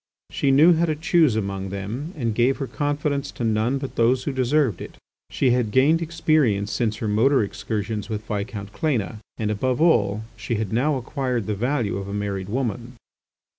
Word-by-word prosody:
She 140 - 0
knew 150 +6 +6
how 165 +1 +2
to 155 - 0
choose 160 -4 +3
among 100 -2 -3
them 105 - -5
and 115 -5 -1
gave 125 +4 +2
her 140 - -3
confidence 145 0 -2
to - - -5
none 110 +4 +1
but 135 -1 -6
those 125 +2 +3
who 145 - -2
deserved 130 - +1
it. - - -8 0.3
She 130 - +1
had 120 -3 +1
gained 145 +8 +3
experience 155 -11 +1
since 110 -3 0
her 110 - -4
motor 115 +5 +3
excursions 105 +1 -4
with 110 -1 -4
Viscount 105 -1 -4
Cléna, 115 - -1 0.2
and 105 -1 -1
above 125 +4 -1
all 110 -11 +3
she 110 +2 -3
had 110 -1 -3
now 140 +6 +2
acquired 125 -3 -2
the 110 - -1
value 120 0 -1
of 100 0 -5
a 100 - -4
married 100 -2 -3
woman. 120 0 -3
120 Hz, 185 wpm, -23 LUFS, 105-140 Hz, 0.3 s, knew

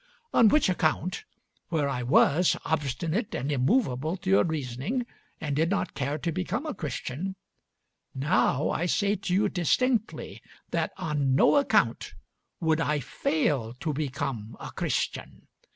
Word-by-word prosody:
On 230 - +6
which 300 +7 +4
account, 180 - 0 0.4
where 155 -4 0
I 125 -3 -2
was 145 +7 +4
obstinate 160 - -1
and 140 +4 -2
immovable 150 - +1
to 185 +1 -3
your 195 - +6
reasoning 160 - -2 0.3
and 145 -5 -2
did 160 +3 +2
not 200 - -1
care 140 +2 -2
to 165 +3 -2
become 185 - -2
a 310 - -3
Christian, 160 - -4 0.8
now 145 0 +2
I 175 - -1
say 205 +3 +2
to 195 -2 -5
you 200 +3 +3
distinctly 220 - 0 0.3
that - - 0
on 145 -4 0
no 140 - +5
account 285 -1 +2 0.4
would 160 -1 +1
I 150 -1 +1
fail 135 -4 -1
to 155 +4 -3
become 135 -6 -4
a - - -7
Christian. - - -3
160 Hz, 140 wpm, -27 LUFS, 140-190 Hz, 0.8 s, On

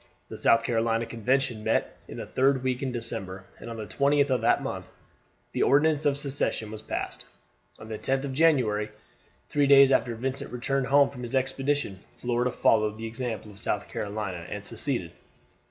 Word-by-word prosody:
The - - -7
South 115 0 +4
Carolina 115 0 +1
Convention 120 0 0
met - - 0
in - - -8
the - - -5
third 130 0 +2
week 130 -1 -1
in 135 -2 -1
December, 95 -5 -4
and - - -8
on 115 - -6
the 110 - -5
20th 140 +3 +2
of 125 -3 +2
that 115 - +3
month - - -4 0.6
the - - -2
Ordinance 150 +1 +3
of 140 -1 +2
Secession 140 -6 -2
was 110 -1 -7
passed. - - -4 0.5
On 110 - -11
the 110 -1 -5
10th 135 0 0
of 140 -2 -4
January, 125 -9 +3 0.6
three 145 -1 +2
days 140 -1 +8
after 120 -3 +2
Vincent 130 +3 -3
returned 130 +2 -1
home 140 0 +5
from 125 - -9
his 120 +2 -4
expedition, 135 -5 0 0.2
Florida 120 0 0
followed 110 -3 +2
the 110 - -6
example 115 -2 -5
of 100 - -14
South - - -2
Carolina 100 -4 -4
and 100 -1 -6
seceded. 115 - -2
125 Hz, 180 wpm, -27 LUFS, 110-135 Hz, 0.6 s, days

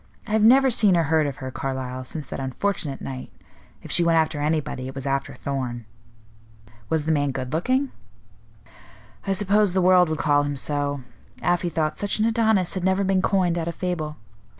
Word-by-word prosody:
I 210 - -8
have 220 0 +3
never 260 +4 +6
seen 205 -6 +4
or 165 - +3
heard 160 0 +2
of 140 - -4
her, 130 -2 -7
Carlyle, 130 -1 -4
since 145 +1 -6
that - - -5
unfortunate 140 +2 -2
night. 130 -1 -7 0.5
If - - -8
she 175 - +4
went 165 -1 +3
after 155 -2 +1
anybody, 150 -4 -1
it 135 - -8
was 135 0 -6
after 135 0 -2
Thorn." 125 -4 -4 1.0
"Was 160 -2 0
the 160 - +1
man 145 -2 +1
good 130 -1 -4
looking?" 255 - 0 1.4
"I 195 - +2
suppose 205 0 +2
the 190 - +2
world 180 -1 +5
would 155 - -1
call 145 -2 +3
him 145 -1 -2
so. 145 0 -1 0.4
Afy 175 0 +1
thought 155 -2 -1
such 205 0 0
an 215 - +2
Adonis 220 -5 +2
had 185 - -3
never 190 +1 +2
been 190 -1 +2
coined, 185 -3 +1
out 165 - -3
of 170 - -3
fable. 160 -5 -3
160 Hz, 195 wpm, -24 LUFS, 140-190 Hz, 1.4 s, never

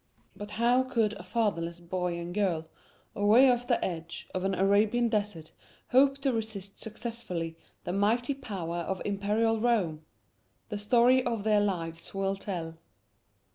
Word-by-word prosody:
But 205 0 -7
how 235 +4 +3
could 230 -5 0
a 200 - -8
fatherless 180 -5 -1
boy 175 0 -2
and 170 +1 -5
girl, 180 -6 0 0.5
away 225 +6 +6
off 245 -1 +1
on - - -19
the 240 - +2
edge 170 -2 -5
of 185 - -2
an 195 0 0
Arabian 210 +5 +3
desert, 205 -7 -2 0.4
hope 275 +2 +5
to 270 -2 +1
resist 215 -3 -5
successfully 220 -7 -5 0.3
the 175 - -3
mighty 230 +7 +1
power 185 -10 -5
of 180 +2 -3
Imperial 210 +3 +1
Rome? 195 -10 +1 0.7
The 210 -2 -3
story 245 +4 +4
of 230 -4 -2
their 210 -1 +3
lives 165 -4 -3
will 195 0 0
tell. 165 -5 -5
205 Hz, 150 wpm, -29 LUFS, 180-230 Hz, 0.7 s, away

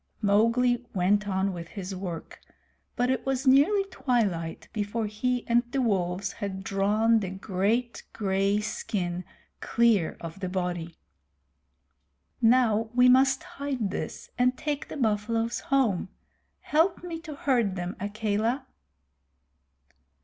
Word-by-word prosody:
Mowgli 230 +4 +3
went 200 +3 +2
on 190 0 0
with 170 -1 -7
his 190 +1 -6
work, 180 -3 -6 0.6
but 245 +1 +1
it 260 - -1
was 270 0 -1
nearly 290 +10 +5
twilight 215 - -1
before 215 +1 -2
he 245 +4 -1
and 235 0 +4
the 275 - 0
wolves 190 -5 0
had 190 -2 -5
drawn 210 +4 +2
the 195 -3 -3
great 200 +5 -1 0.2
gay 195 0 +1
skin 185 -4 -3 0.4
clear 230 -8 +2
of 165 +2 -8
the 185 -2 -3
body. 175 -3 -3 1.5
"Now 225 -2 +4
we 250 0 +6
must 265 +5 +4
hide 280 - -3
this - - -5
and 250 +1 +3
take 295 -2 -3
the - - -7
buffaloes 225 0 0
home! 235 -10 +1 0.5
Help 330 +4 +1
me 335 -2 -5
to 315 -3 -8
herd 240 -9 +1
them, 180 0 -4
Akela." 215 +5 -1
215 Hz, 125 wpm, -27 LUFS, 190-250 Hz, 1.5 s, we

